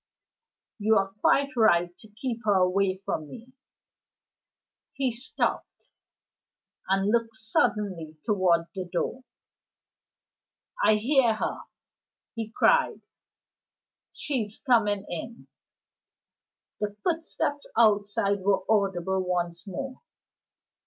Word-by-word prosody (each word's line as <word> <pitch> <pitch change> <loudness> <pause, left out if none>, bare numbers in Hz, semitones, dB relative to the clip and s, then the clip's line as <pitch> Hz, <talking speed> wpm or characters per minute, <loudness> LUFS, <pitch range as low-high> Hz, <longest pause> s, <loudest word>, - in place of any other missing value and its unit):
You 220 +1 +3
are 195 0 0
quite 280 0 +3
right 175 -6 +3
to 220 - -12
keep 225 +3 -4
me 210 -1 +3
away 185 +1 +2
from 160 -5 -4
her." 235 -2 -10 1.5
He 270 -2 0
stopped 245 +5 -3 1.0
and 195 +2 +2
looked 230 -1 0
suddenly 200 -7 -1
toward 185 -5 +3
the 185 -1 -4
door. 250 +8 -2 1.6
"I 215 - +6
hear 240 +1 +3
her," - - -3 0.7
he 225 -2 -4
cried, 485 - +3 1.1
"She's 225 -8 -2
coming 210 -7 +2
in!" 230 +7 -7 1.3
The 210 -1 -3
footsteps 320 -4 -2
outside 205 -2 +3
were 195 0 +1
audible 190 -3 +1
once 175 0 -2
more. 260 +7 -6
210 Hz, 95 wpm, -27 LUFS, 190-235 Hz, 1.6 s, I